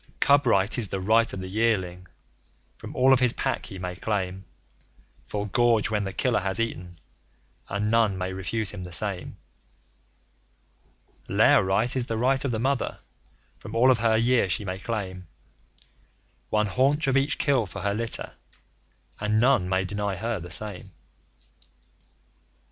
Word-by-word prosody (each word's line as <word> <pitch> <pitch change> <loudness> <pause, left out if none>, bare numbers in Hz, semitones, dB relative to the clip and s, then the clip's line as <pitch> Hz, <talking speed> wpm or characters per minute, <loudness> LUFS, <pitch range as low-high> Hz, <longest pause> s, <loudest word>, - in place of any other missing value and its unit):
Cub 140 -1 +4
Right 100 +1 +2
is 110 - +1
the 95 - -4
right 110 +4 +3
of 95 - -6
the 95 - -6
Yearling. 95 -4 -1 0.7
From - - -10
all 130 +1 +5
of 130 - +4
his 125 -2 +3
Pack - - -2
he 95 - -8
may 90 -1 -5
claim 95 -2 -3 0.8
Full 105 0 -3
gorge 115 0 +2
when 105 -2 0
the 95 - -4
killer 125 +3 +1
has 95 0 -1
eaten; 90 -6 -4 0.7
and 105 +2 -1
none 115 -4 +2
may 95 0 -3
refuse 100 +3 -2
him 100 -3 -7
the 90 - -9
same. 95 +1 -1 1.9
Lair - - +5
Right 100 +7 0
is 130 -2 +1
the 115 - -2
right 130 +3 +2
of 140 - -1
the 115 - -1
Mother. 135 +3 -1 0.6
From - - -9
all 125 +3 +5
of 125 - +2
her 110 -1 +3
year 115 -3 +2
she 100 +4 -1
may 95 0 -4
claim 95 -5 -5 1.2
One 105 0 +2
haunch 135 +8 +1
of 135 -1 +1
each 135 +2 +1
kill 135 -7 +1
for 85 - -8
her 100 0 0
litter, 115 +2 -3 0.9
and 105 +1 +1
none 120 -7 +3
may 95 0 +1
deny 100 +1 -3
her 110 +2 -3
the 85 +1 -9
same. 95 +2 -4
105 Hz, 160 wpm, -26 LUFS, 95-120 Hz, 1.9 s, all